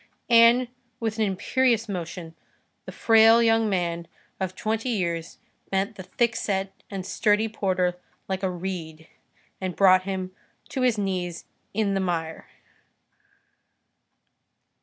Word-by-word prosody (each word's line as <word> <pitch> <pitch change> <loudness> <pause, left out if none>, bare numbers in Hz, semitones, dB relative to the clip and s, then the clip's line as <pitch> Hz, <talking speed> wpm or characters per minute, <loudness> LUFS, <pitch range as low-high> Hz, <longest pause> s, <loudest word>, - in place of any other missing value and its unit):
And, 235 +2 +6 0.3
with 225 -1 -3
an 220 - +3
imperious 230 +4 +1
motion, 175 -3 -6 0.5
the - - -5
frail 225 +1 +5
young 225 -1 +3
man 170 -3 -1 0.3
of 185 -1 -3
twenty 220 +4 -2
years 170 -7 -2 0.3
bent 195 +1 -1
the - - -8
thickset 195 -2 -1 0.2
and 195 -2 -5
sturdy 215 +1 +2
porter 185 -4 -1 0.3
like 190 -1 -2
a 190 - 0
reed, 170 -3 -6 0.5
and 185 -2 -3
brought 185 -2 +6
him 185 -1 -4 0.4
to 265 - -3
his 250 -3 +2
knees 180 -4 -3 0.3
in 205 -2 +1
the 195 - 0
mire. 165 -3 -3
195 Hz, 120 wpm, -25 LUFS, 180-225 Hz, 0.5 s, And